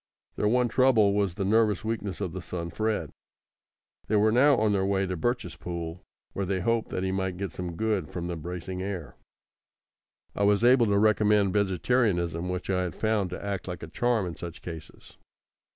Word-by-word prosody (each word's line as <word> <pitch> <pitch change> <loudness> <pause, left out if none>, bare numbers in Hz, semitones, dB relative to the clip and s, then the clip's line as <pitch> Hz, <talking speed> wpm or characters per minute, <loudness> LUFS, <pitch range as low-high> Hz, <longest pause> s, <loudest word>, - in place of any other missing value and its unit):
Their 105 - 0
one 125 +2 +3
trouble 115 -5 +4
was 100 -4 0
the 95 - -2
nervous 110 0 +2
weakness 105 -3 -3
of 95 -4 -3
the 95 - -5
son 85 -1 -5
Fred. 110 +4 -1 1.0
They 110 - +1
were 105 +1 +4
now 135 +5 +5
on 110 -2 +2
their 95 -1 +1
way 95 0 +1
to 90 0 -3
Birchespool, 85 -4 -3 0.3
where 100 - -2
they 95 -1 0
hoped 115 +4 0
that 90 - -3
he 95 - 0
might 95 -1 -2
get 100 -2 -4
some 90 -1 -5
good 105 -5 -1
from 85 -1 -5
the 85 0 -3
bracing 90 +3 -5
air. 95 -5 -5 1.2
I - - -3
was 100 +2 +3
able 120 -1 +6
to 100 -1 +2
recommend 105 -2 +3
vegetarianism, 95 -4 +1
which 90 0 -3
I 90 -1 +1
have 90 -4 -3
found 110 -4 0
to 90 +3 -6
act 100 -2 -3
like 90 -3 -6
a - - -5
charm 120 -4 0
in 85 -2 -5
such 85 -1 -8
cases. 80 -3 -10
100 Hz, 190 wpm, -27 LUFS, 90-110 Hz, 1.2 s, able